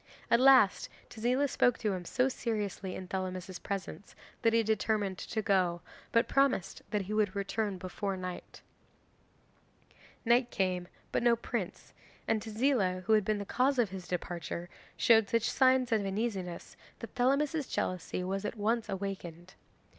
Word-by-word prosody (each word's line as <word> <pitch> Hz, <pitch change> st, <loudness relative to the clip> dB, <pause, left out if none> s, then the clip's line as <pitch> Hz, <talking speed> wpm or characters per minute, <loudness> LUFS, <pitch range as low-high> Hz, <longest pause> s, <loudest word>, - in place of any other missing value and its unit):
At 235 Hz, -, +6 dB
last 260 Hz, -6 st, +5 dB, 0.2 s
Tezila 250 Hz, +5 st, +1 dB
spoke 245 Hz, -2 st, +2 dB
to 210 Hz, -4 st, -1 dB
him 180 Hz, -1 st, -5 dB
so 255 Hz, +8 st, +1 dB
seriously 210 Hz, -7 st, -3 dB
in 185 Hz, -, -7 dB
Thelamis's 185 Hz, -1 st, -4 dB
presence, 200 Hz, 0 st, -6 dB, 0.3 s
that 230 Hz, -, +4 dB
he 230 Hz, 0 st, +3 dB
determined 210 Hz, -3 st, 0 dB
to 220 Hz, -1 st, -3 dB
go, 180 Hz, -4 st, +2 dB, 0.3 s
but 230 Hz, 0 st, +3 dB
promised 270 Hz, -9 st, +1 dB
that 210 Hz, -1 st, -1 dB
he 200 Hz, +3 st, -5 dB
would 210 Hz, -2 st, +1 dB
return 200 Hz, 0 st, -2 dB
before 190 Hz, +2 st, -4 dB
night. 185 Hz, -1 st, -7 dB, 1.6 s
'Night 240 Hz, +1 st, +4 dB
came 180 Hz, -4 st, -1 dB, 0.2 s
but -, -, +1 dB
no 235 Hz, -1 st, +4 dB
prince, 230 Hz, -, -5 dB, 0.3 s
and 220 Hz, -1 st, +1 dB
Tezila, 215 Hz, -5 st, 0 dB
who 220 Hz, -, +2 dB
had 215 Hz, -1 st, +5 dB
been 215 Hz, +2 st, 0 dB
the 200 Hz, -, -5 dB
cause 260 Hz, +6 st, +1 dB
of 230 Hz, -6 st, +2 dB
his 185 Hz, -2 st, -7 dB
departure, 175 Hz, -1 st, -4 dB, 0.3 s
showed 225 Hz, -3 st, +5 dB
such 230 Hz, 0 st, +1 dB
signs 260 Hz, -1 st, +3 dB
of 220 Hz, -2 st, +2 dB
uneasiness 195 Hz, -3 st, -3 dB, 0.2 s
that 230 Hz, -, -9 dB
Thelamis's 280 Hz, +4 st, +1 dB
jealousy 185 Hz, 0 st, -2 dB
was 195 Hz, +2 st, -2 dB
at 210 Hz, +2 st, -4 dB
once 225 Hz, +2 st, 0 dB
awakened. 185 Hz, -2 st, -5 dB
205 Hz, 155 wpm, -31 LUFS, 185-235 Hz, 1.6 s, At